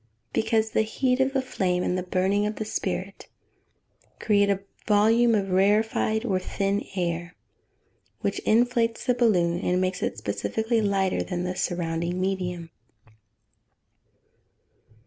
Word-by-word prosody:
_ -, -, -40 dB
Because 220 Hz, 0 st, +1 dB
the -, -, +2 dB
heat 250 Hz, +4 st, 0 dB
of 265 Hz, +1 st, +2 dB
the 270 Hz, -1 st, 0 dB
flame, 180 Hz, -7 st, -1 dB
and 180 Hz, -, 0 dB
the 185 Hz, -, -1 dB
burning 190 Hz, +3 st, +1 dB
of 215 Hz, -, -4 dB
the 215 Hz, -, -4 dB
spirit, 215 Hz, -, -4 dB, 0.8 s
A, -, -, -37 dB
create 205 Hz, -1 st, +3 dB
a 195 Hz, -1 st, +1 dB, 0.3 s
volume 225 Hz, +3 st, +4 dB
of 195 Hz, -2 st, -1 dB
rarefied, 215 Hz, +3 st, +2 dB
or 190 Hz, -5 st, +1 dB
thin 200 Hz, +2 st, -1 dB
air, 175 Hz, -1 st, -2 dB, 0.9 s
which -, -, -1 dB
inflates 235 Hz, 0 st, +1 dB
the 250 Hz, -, +3 dB
balloon, 180 Hz, -8 st, +2 dB
and 180 Hz, 0 st, 0 dB
makes 185 Hz, 0 st, -1 dB
it -, -, -2 dB
specifically 225 Hz, +1 st, -1 dB
lighter 195 Hz, -2 st, +1 dB
than 180 Hz, -1 st, -3 dB
the 180 Hz, 0 st, -3 dB
surrounding 170 Hz, 0 st, -2 dB
medium. 180 Hz, -3 st, -3 dB
200 Hz, 140 wpm, -25 LUFS, 180-220 Hz, 0.9 s, volume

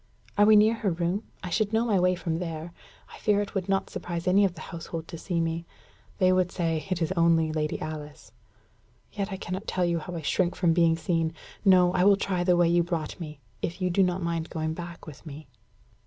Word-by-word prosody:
"Are 205 Hz, 0 st, +5 dB
we 215 Hz, -, +8 dB
near 215 Hz, +2 st, +6 dB
her 225 Hz, -3 st, -1 dB
room? 175 Hz, +4 st, -1 dB, 0.2 s
I 180 Hz, -, -5 dB
should 215 Hz, +3 st, 0 dB
know 225 Hz, +1 st, +2 dB
my 210 Hz, -5 st, +2 dB
way 180 Hz, 0 st, +3 dB
from 165 Hz, -2 st, -3 dB
there. 165 Hz, -1 st, -5 dB, 0.4 s
I -, -, -11 dB
fear 210 Hz, -1 st, +2 dB
it 205 Hz, -, -3 dB
would 195 Hz, -1 st, -2 dB
not 195 Hz, 0 st, 0 dB
surprise 175 Hz, 0 st, -5 dB
any 195 Hz, +3 st, +5 dB
of 185 Hz, -3 st, +1 dB
the 155 Hz, -, -10 dB
household 165 Hz, 0 st, -6 dB
to 165 Hz, -, -6 dB
see 175 Hz, -1 st, -2 dB
me. 165 Hz, 0 st, -2 dB, 0.5 s
They 185 Hz, 0 st, +4 dB
would 185 Hz, -1 st, +2 dB
say 165 Hz, -1 st, -1 dB
'It 180 Hz, -3 st, 0 dB
is 165 Hz, -, -1 dB
only 165 Hz, -3 st, +3 dB
Lady 155 Hz, -1 st, -2 dB
Alice.' 155 Hz, -1 st, -7 dB, 0.8 s
Yet 200 Hz, 0 st, -3 dB
I 190 Hz, -, -3 dB
cannot 185 Hz, +2 st, -5 dB
tell 180 Hz, -1 st, 0 dB
you 170 Hz, -1 st, 0 dB
how 175 Hz, +3 st, -7 dB
I 165 Hz, -, -4 dB
shrink 175 Hz, +5 st, +1 dB
from 175 Hz, -2 st, +2 dB
being 165 Hz, -1 st, +4 dB
seen. 165 Hz, -1 st, -1 dB, 0.3 s
No 180 Hz, -3 st, +5 dB
I 180 Hz, -, +2 dB
will 200 Hz, 0 st, +6 dB
try 185 Hz, -3 st, -1 dB
the 175 Hz, -1 st, +3 dB
way 175 Hz, -1 st, +4 dB
you 175 Hz, +1 st, +4 dB
brought 170 Hz, -2 st, -3 dB
me 150 Hz, -4 st, -8 dB, 0.2 s
if 170 Hz, -, -3 dB
you 180 Hz, -1 st, 0 dB
do 195 Hz, -, +3 dB
not 180 Hz, -1 st, +1 dB
mind 165 Hz, -1 st, -2 dB
going 160 Hz, -1 st, -2 dB
back 175 Hz, +1 st, -8 dB
with 150 Hz, -4 st, -11 dB
me." 155 Hz, -1 st, -9 dB
175 Hz, 230 wpm, -27 LUFS, 165-185 Hz, 0.8 s, we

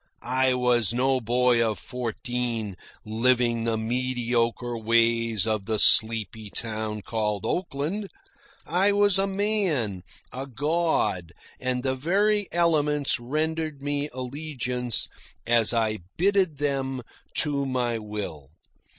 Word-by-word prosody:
I 130 Hz, +1 st, +2 dB
was 120 Hz, -3 st, +2 dB
no 130 Hz, +1 st, +2 dB
boy 120 Hz, +1 st, +3 dB
of 110 Hz, -3 st, -1 dB
fourteen, 120 Hz, -2 st, -4 dB, 0.3 s
living 115 Hz, +1 st, +1 dB
the 115 Hz, -1 st, 0 dB
mediocre 120 Hz, 0 st, -1 dB
ways 115 Hz, -1 st, +2 dB
of 110 Hz, -3 st, -1 dB
the 110 Hz, 0 st, -1 dB
sleepy 110 Hz, 0 st, +4 dB
town 110 Hz, -1 st, -3 dB
called 105 Hz, -3 st, -2 dB
Oakland. 180 Hz, +4 st, -2 dB, 0.6 s
I 190 Hz, +5 st, +2 dB
was 205 Hz, -1 st, +4 dB
a 195 Hz, -, +1 dB
man, 190 Hz, -, -1 dB, 0.3 s
a 135 Hz, +3 st, -5 dB
god, 135 Hz, -, 0 dB, 0.3 s
and 125 Hz, -1 st, -1 dB
the 130 Hz, -1 st, +1 dB
very 200 Hz, +8 st, +1 dB
elements 150 Hz, -5 st, +2 dB
rendered 155 Hz, +3 st, -2 dB
me 145 Hz, +1 st, -2 dB
allegiance 125 Hz, -2 st, -3 dB, 0.4 s
as 115 Hz, -2 st, +5 dB
I 110 Hz, -2 st, 0 dB, 0.2 s
bitted 185 Hz, -4 st, +2 dB
them 135 Hz, -3 st, -2 dB, 0.4 s
to 140 Hz, -2 st, -1 dB
my 120 Hz, -3 st, -1 dB
will. 105 Hz, -10 st, -6 dB
125 Hz, 115 wpm, -26 LUFS, 115-150 Hz, 0.6 s, as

